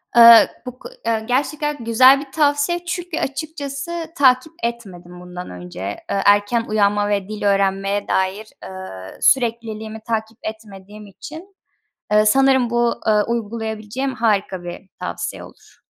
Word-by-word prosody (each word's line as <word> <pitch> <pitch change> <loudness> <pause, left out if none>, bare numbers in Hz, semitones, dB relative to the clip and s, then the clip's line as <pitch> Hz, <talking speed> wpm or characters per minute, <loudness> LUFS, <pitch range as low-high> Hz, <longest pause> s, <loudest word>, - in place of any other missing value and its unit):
Eee, 235 -1 +9 0.2
bu 250 0 -8
ko - - -10 0.2
eee, 225 -1 0
gerçekten 295 +3 -1
güzel 255 +4 +6
bir 275 -1 -10
tavsiye. 295 +4 +1
Çünkü 350 -2 -4
açıkçası 310 +3 -5
takip 260 +3 +3
etmedim 185 -7 -6
bundan 180 0 -8
önce. 90 0 -10
Eee, 100 - -3
erken 205 +3 +3
uyanma 205 -1 +1
ve 200 -2 -1
dil 215 -1 -6
öğrenmeye 195 0 0
dair, 190 +3 -1 0.2
eee, 185 - -9
sürekliliğimi 225 -3 0
takip 225 0 -3
etmediğim 210 -1 -9
için, 320 - -11 0.6
eee, 210 0 +4
sanırım 265 +1 +4
bu, 240 0 +1
ııı, 210 -1 +4
uygulayabileceğim 225 +2 -3
harika 200 -5 0
bir 175 +2 -9
tavsiye - - -5
olur. - - -17
220 Hz, 130 wpm, -20 LUFS, 200-265 Hz, 0.6 s, Eee